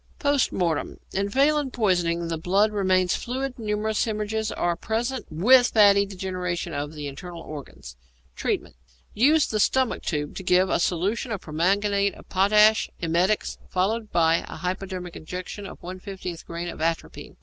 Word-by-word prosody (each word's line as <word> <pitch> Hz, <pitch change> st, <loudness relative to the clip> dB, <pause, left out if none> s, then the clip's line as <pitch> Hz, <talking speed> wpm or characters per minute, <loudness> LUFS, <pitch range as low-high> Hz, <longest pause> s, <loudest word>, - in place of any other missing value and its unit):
Post 285 Hz, -2 st, +2 dB
Mortem. 170 Hz, -4 st, -1 dB
In 200 Hz, +1 st, 0 dB
phallin 285 Hz, +4 st, +2 dB
poisoning 175 Hz, -7 st, +1 dB
the 165 Hz, -1 st, -2 dB
blood 195 Hz, +6 st, +2 dB
remains 185 Hz, -3 st, +2 dB
fluid; 260 Hz, +1 st, -4 dB
numerous 215 Hz, 0 st, 0 dB
hæmorrhages 220 Hz, 0 st, -2 dB
are 175 Hz, -1 st, +1 dB
present, 235 Hz, +8 st, -2 dB
with 245 Hz, +11 st, +5 dB
fatty 200 Hz, -2 st, +5 dB
degeneration 180 Hz, -3 st, -4 dB
of 145 Hz, +1 st, -4 dB
the 150 Hz, -1 st, -6 dB
internal 165 Hz, +5 st, -7 dB
organs. 140 Hz, -, -9 dB, 0.4 s
Treatment. -, -, -2 dB, 0.4 s
Use 295 Hz, +7 st, +4 dB
the 215 Hz, -, -2 dB
stomach 260 Hz, +4 st, +2 dB
tube 150 Hz, -3 st, -3 dB
to 190 Hz, -, -6 dB
give 180 Hz, +1 st, +3 dB
a -, -, +2 dB
solution 195 Hz, +8 st, 0 dB
of 205 Hz, -4 st, -3 dB
permanganate 200 Hz, +5 st, +1 dB
of -, -, -15 dB
potash, 210 Hz, +3 st, +4 dB
emetics, 175 Hz, +5 st, 0 dB
followed 215 Hz, +4 st, -1 dB
by 165 Hz, -1 st, +4 dB
a -, -, -8 dB
hypodermic 180 Hz, +1 st, -4 dB
injection 180 Hz, +4 st, -7 dB
of -, -, -11 dB
1/50 185 Hz, -1 st, -7 dB
grain 170 Hz, +1 st, -5 dB
of 170 Hz, -, -7 dB
atropine. 165 Hz, 0 st, -3 dB
190 Hz, 150 wpm, -25 LUFS, 170-215 Hz, 0.4 s, with